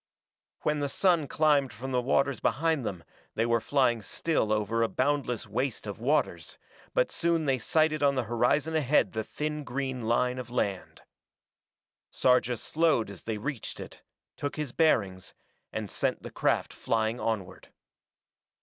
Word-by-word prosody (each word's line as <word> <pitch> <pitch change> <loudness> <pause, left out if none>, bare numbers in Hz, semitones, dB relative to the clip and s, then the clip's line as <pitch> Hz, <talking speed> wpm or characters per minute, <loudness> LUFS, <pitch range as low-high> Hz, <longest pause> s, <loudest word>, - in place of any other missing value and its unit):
When 150 0 +1
the 145 -1 -1
sun 170 -2 +2
climbed 145 -4 +2
from 130 +5 -6
the 125 -1 +2
waters 135 0 +1
behind 160 +2 +1
them 90 -6 -4 0.3
they 110 - +1
were 115 -1 +2
flying 120 -3 +2
still 110 -1 -1
over 110 +2 +1
a 115 - +3
boundless 130 -2 0
waste 120 +4 -2
of 105 -1 -6
waters, 140 +7 0 0.4
but - - +2
soon 170 -2 +1
they 135 -2 +1
sighted 155 +2 +2
on 140 -1 +3
the 130 - +1
horizon 125 +8 +1
ahead 150 -2 +3
the 110 0 -2
thin 150 +5 -4
green 130 -1 -3
line 125 +2 +1
of 125 -2 -7
land. 100 -6 -3 1.1
Sarja 125 -1 +3
slowed 155 -7 +1
as 95 - -11
they 110 -1 -3
reached 125 +2 -5
it, - - -9 0.4
took 145 - -3
his 150 -4 -3
bearings, 100 - +1 0.4
and - - -4
sent - - -1
the - - -7
craft - - 0
flying 110 +1 -1
onward. 110 -5 -4
130 Hz, 155 wpm, -29 LUFS, 115-150 Hz, 1.1 s, a